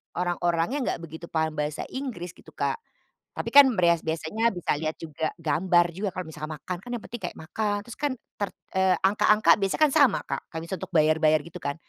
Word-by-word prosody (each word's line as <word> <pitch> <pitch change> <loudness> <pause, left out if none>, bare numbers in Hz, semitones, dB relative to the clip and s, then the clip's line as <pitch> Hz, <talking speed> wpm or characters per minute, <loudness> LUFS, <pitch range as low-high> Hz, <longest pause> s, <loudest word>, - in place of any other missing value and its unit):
orang-orangnya 175 - 0
enggak - - -1
begitu 160 +1 -8
paham 160 -1 0
bahasa 150 0 -2
Inggris 240 -11 -5
gitu - - -16
Kak, - - -1 0.6
tapi - - -2
kan 285 0 +10
breas 170 -2 +4
biasanya 160 +8 0
bisa 175 -4 -1
lihat 155 0 -2
juga 160 -1 -3
gambar 175 +2 +2
juga. 200 +2 -2
Kalau 185 -1 -4
misalkan 155 0 -6
makan 180 +3 -5
kan 245 - -10
yang 235 - -4
penting 240 -2 -7
kayak 175 - -5
makan, 205 +6 -2
terus 240 - -9
kan 290 -1 0 0.3
ter 205 -2 -1 0.3
eee, 190 -1 +4
angka-angka 210 +2 +5
biasanya 195 +8 -1
kan - - -4
sama 280 -8 +5
Kak. - - -3
Kayak 160 - -4
misalnya 185 +1 -5
untuk - - -28
bayar-bayar, 155 0 +4
gitu 170 +1 -9
kan. 145 0 -2
175 Hz, 200 wpm, -26 LUFS, 160-205 Hz, 0.6 s, kan